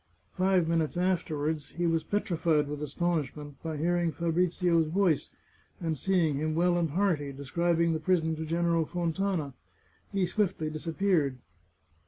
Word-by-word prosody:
Five 185 Hz, -2 st, +2 dB
minutes 165 Hz, 0 st, 0 dB
afterwards, 160 Hz, -4 st, -1 dB
he 175 Hz, +1 st, -1 dB
was 165 Hz, -1 st, +1 dB
petrified 165 Hz, -6 st, +1 dB
with 145 Hz, 0 st, -5 dB
astonish 155 Hz, 0 st, -1 dB
ment 145 Hz, -2 st, -10 dB
by 160 Hz, -2 st, -4 dB
hearing 170 Hz, +2 st, +1 dB
Fabrizio's 170 Hz, 0 st, +1 dB
voice, 175 Hz, -2 st, +1 dB, 0.5 s
and 165 Hz, -2 st, -1 dB
seeing 165 Hz, -3 st, +1 dB
him 155 Hz, +1 st, -1 dB
well 175 Hz, +1 st, +3 dB
and 170 Hz, -2 st, +1 dB
hearty, 160 Hz, -4 st, 0 dB
describing 170 Hz, +5 st, +1 dB
the 160 Hz, -, -1 dB
prison 160 Hz, -1 st, +1 dB
to 160 Hz, -, -3 dB
General 165 Hz, 0 st, +1 dB
Fontana. 175 Hz, -3 st, -1 dB, 0.6 s
He 195 Hz, -2 st, +1 dB
swiftly 175 Hz, -4 st, -1 dB
disappeared. 160 Hz, -3 st, 0 dB
165 Hz, 140 wpm, -29 LUFS, 155-175 Hz, 0.6 s, well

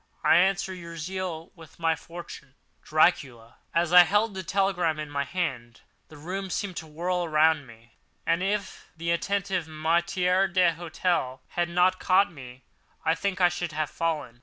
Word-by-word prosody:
I -, -, +6 dB
answer 190 Hz, +1 st, +2 dB
your 170 Hz, -2 st, -9 dB
zeal 175 Hz, 0 st, -5 dB
with 165 Hz, -3 st, -16 dB
my 165 Hz, -1 st, +1 dB
fortune.—Dracula. 155 Hz, -5 st, -2 dB
As 170 Hz, 0 st, 0 dB
I 180 Hz, -, +11 dB
held 205 Hz, +5 st, +2 dB
the 190 Hz, -, -4 dB
telegram 180 Hz, -4 st, 0 dB
in 150 Hz, -1 st, -6 dB
my 140 Hz, -1 st, -1 dB
hand, 135 Hz, -8 st, -4 dB, 0.3 s
the 155 Hz, -, -14 dB
room 190 Hz, +5 st, -5 dB
seemed 190 Hz, 0 st, -3 dB
to 160 Hz, -, -6 dB
whirl 175 Hz, +3 st, -2 dB
around 155 Hz, -3 st, +2 dB
me; 115 Hz, 0 st, -17 dB, 0.3 s
and, 165 Hz, +1 st, +1 dB
if 200 Hz, 0 st, -3 dB
the 170 Hz, +1 st, -2 dB
attentive 185 Hz, -1 st, -1 dB
maître 175 Hz, +4 st, +1 dB
d'hôtel 170 Hz, -6 st, 0 dB
had 175 Hz, 0 st, -1 dB
not 180 Hz, +2 st, +2 dB
caught 190 Hz, +1 st, +3 dB
me, 130 Hz, -3 st, -12 dB, 0.4 s
I 160 Hz, -, +4 dB
think 195 Hz, +2 st, -2 dB
I 180 Hz, -, +6 dB
should 175 Hz, -2 st, -4 dB
have 155 Hz, 0 st, -2 dB
fallen. 150 Hz, -8 st, -3 dB
170 Hz, 160 wpm, -27 LUFS, 155-185 Hz, 0.4 s, I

